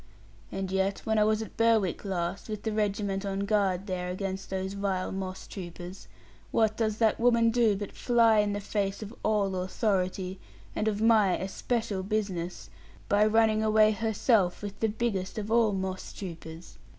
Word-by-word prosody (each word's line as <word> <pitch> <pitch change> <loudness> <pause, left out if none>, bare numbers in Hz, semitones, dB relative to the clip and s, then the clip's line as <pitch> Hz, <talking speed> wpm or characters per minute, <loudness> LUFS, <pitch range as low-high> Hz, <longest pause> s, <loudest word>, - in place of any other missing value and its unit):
And 190 -1 -3
yet 190 +1 0
when 220 -1 +2
I - - +5
was 215 +1 +2
at - - -11
Berwick 225 -6 +2
last, 185 0 -3
with 215 -1 -5
the 220 - -1
regiment 205 -2 -1
on 195 0 -2
guard 200 -2 +1
there 180 -2 -3
against 190 +1 -4
those 190 0 -3
vile 195 -2 -2
moss 190 -1 -5
troopers, 180 0 -8 0.4
what 220 -1 +2
does 215 -2 0
that 220 -1 +2
woman 230 -1 +4
do 230 -3 +3
but 200 0 -5
fly 230 -3 +3
in 205 -1 +1
the 205 - -2
face 200 0 -2
of 210 +2 -8
all 205 -3 +1
authority, 185 -1 -1 0.4
and 215 - -1
of 215 0 0
my 215 -5 +4
especial 200 +1 -2
business, 190 -4 -3 0.4
by 205 +1 +4
running 220 0 +3
away 215 0 +5
herself 215 -3 +1
with 205 -1 -6
the 225 - +1
biggest 205 -4 -2
of 215 0 -4
all 230 -2 +4
moss 190 -1 -4
troopers? 170 -3 -9
205 Hz, 170 wpm, -28 LUFS, 190-220 Hz, 0.4 s, I